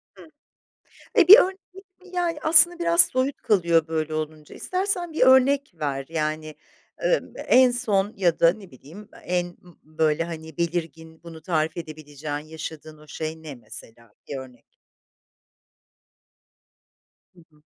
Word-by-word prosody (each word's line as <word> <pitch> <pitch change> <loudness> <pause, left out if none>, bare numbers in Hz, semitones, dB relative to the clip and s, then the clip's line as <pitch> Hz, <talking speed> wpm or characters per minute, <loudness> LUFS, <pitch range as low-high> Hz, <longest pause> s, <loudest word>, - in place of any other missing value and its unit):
Hıh. - - -15 0.9
E, 350 - +5
bir 420 +5 +11
örnek 380 +1 +1
ve, 385 - -12 0.3
yani, 345 -3 -2
aslında 335 +2 +6
biraz 340 0 +3
soyut 260 +2 -2
kalıyor 170 -5 +2
böyle 155 -1 -3
olunca 155 -1 -6
istersen 365 -2 -2
bir 310 - -2
örnek 265 +2 +4
ver, 140 -4 -4
yani, 155 -1 -4 0.5
ımm, - - 0
en 255 -1 +5
son 210 -4 -1
ya 175 -4 0
da 165 0 +5
ne 195 -3 -14
bileyim 165 +11 -14 0.2
e 180 - -4
en 175 0 0 0.2
ımm, 175 -2 -19
böyle, 155 +1 -1
hani, 160 -2 -9
belirgin 160 -1 -5
bunu 165 -1 -12
tarif 160 -2 -2
edebileceğin 150 -2 -7
yaşadığın 155 0 -10
o 150 - -18
şey 160 0 -6
ne 150 -3 -9
mesela, 115 -1 -13 0.2
bir 140 - -5
örnek? 130 -2 -11 2.7
Hı - - -19
hı. 150 0 -27
165 Hz, 140 wpm, -23 LUFS, 155-255 Hz, 2.7 s, bir